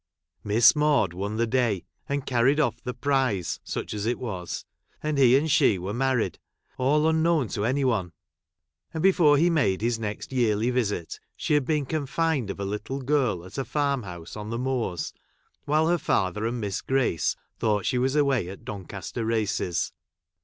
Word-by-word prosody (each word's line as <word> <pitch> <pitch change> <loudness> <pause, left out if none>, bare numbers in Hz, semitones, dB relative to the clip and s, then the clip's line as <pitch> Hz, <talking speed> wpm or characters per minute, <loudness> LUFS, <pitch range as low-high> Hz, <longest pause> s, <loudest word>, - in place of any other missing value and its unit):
Miss 110 +7 +5
Maude 150 - +2
won 100 +4 -3
the 115 - +2
day 115 -5 0 0.2
and 140 -1 -1
carried 130 +4 +2
off" 150 - 0
the 125 -1 -4
prize, 130 - 0
such - - -4
as 105 +1 -3
it 120 - 0
was; 95 -8 -5 0.4
and 150 -2 0
he 130 -1 +6
and 155 +2 0
she 140 - +4
were 95 +3 -4
married, 130 -1 0 0.4
all 150 +4 +3
unknown 160 -5 +2
to 105 -2 -2
any 135 +3 +1
one; 105 -9 0 0.8
and 160 - -2
before 170 -6 +5
he 165 +4 +4
made 110 - +2
his 115 0 0
next 105 +2 -5
yearly 115 -1 +2
visit, 105 -9 -2 0.2
she - - -1
had 145 -3 +3
been 150 -1 0
confined 150 -3 -1
of 100 - -5
a 100 - -2
little 105 +7 -4
girl 130 - 0
at 95 +8 -7
a - - 0
fai'm 140 -2 0
house 90 -5 -9
on 105 0 -6
the 115 - -2
Moors, 125 -9 -2 0.5
while 155 +2 +2
her 175 0 +2
father 105 - 0
and 120 +1 -3
Miss 100 -3 -3
Grace 130 - +1 0.2
thought 105 -3 +1
she 125 - +1
was 130 +3 +1
away 135 -10 +2
at 95 - -10
Doncaster 100 +3 -6
Races. 110 -6 -1
125 Hz, 180 wpm, -26 LUFS, 105-140 Hz, 0.8 s, he